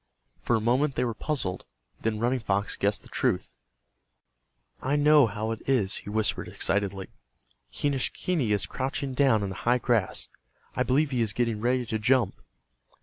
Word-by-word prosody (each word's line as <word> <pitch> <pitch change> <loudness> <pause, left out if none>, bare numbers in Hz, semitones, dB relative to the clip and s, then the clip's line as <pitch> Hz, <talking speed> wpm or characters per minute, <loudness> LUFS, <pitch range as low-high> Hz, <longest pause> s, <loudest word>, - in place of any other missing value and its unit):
For 120 - +1
a - - +2
moment 130 +5 +1
they - - +1
were 115 - -1
puzzled. 110 - -3 0.4
Then 110 -1 -1
Running 120 +4 +1
Fox 100 -2 -1
guessed 100 +1 0
the - - -13
truth. - - -1 1.3
"I 140 +3 0
know 150 -2 +6
how 110 +1 -3
it 115 - -4
is," 110 -7 +2
he - - -8
whispered, 110 +1 0
excitedly. 100 -1 -1 0.6
"Quenischquney 145 - 0
is 105 -1 +2
crouching 135 +1 -3
down 130 -6 +3
in 100 - -2
the 95 - -6
high 120 +1 +3
grass. 115 -5 0 0.5
I - - 0
believe 145 +3 +2
he 125 -2 0
is 110 -3 0
getting 115 -1 -1
ready 125 +1 +1
to 110 -1 -2
jump." 120 -2 +3
120 Hz, 165 wpm, -27 LUFS, 105-130 Hz, 1.3 s, know